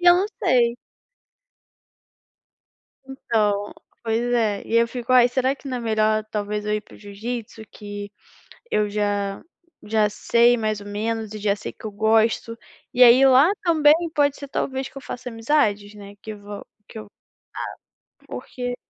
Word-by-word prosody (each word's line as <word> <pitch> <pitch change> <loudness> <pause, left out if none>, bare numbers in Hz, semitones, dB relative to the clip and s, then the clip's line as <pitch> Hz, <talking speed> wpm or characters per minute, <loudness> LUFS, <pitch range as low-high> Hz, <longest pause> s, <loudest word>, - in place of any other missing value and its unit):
e 350 - -1
eu 350 - +9
não 385 +3 +1 0.2
sei. 235 -2 +3 2.3
Então, 210 -6 -1 0.3
pois 225 0 0
é, 215 -4 +1
e 230 - -2
eu 235 0 +4
fico: 245 +1 -5
"Ai 250 -1 +7
será 260 +2 0
que 280 - -12
não 255 -1 -3
é - - -5
melhor 215 -1 +1
talvez 210 0 -3
eu 210 - 0
ir 215 - -1
para - - -17
o - - -15
jiu-jitsu 220 +2 -7
que 205 -1 -8 0.6
eu 210 -1 +1
já 205 -1 -2 0.4
já 210 -1 +1
sei 235 +3 +3
mais 215 -2 -2
ou 205 - -10
menos 220 +1 -3
e - - -5
já 205 -1 0
sei 210 - -7
que - - -14
eu 215 - -4
gosto?", 220 +2 +1 0.4
e 250 - +6
aí 250 +2 +7
lá 270 +7 +6
também 310 -4 +5 0.2
pode 285 -1 +2
ser 280 - -8
talvez 265 -1 -3
que - - -13
eu 275 - -7
faça 250 -1 -7
amizades 225 -4 0
né 200 0 -11
que 220 - -7
va 205 0 -9 0.2
que 220 - -9
eu 215 - -9 1.2
ah, - - -25
porque 245 -1 -5
225 Hz, 170 wpm, -23 LUFS, 210-250 Hz, 2.3 s, eu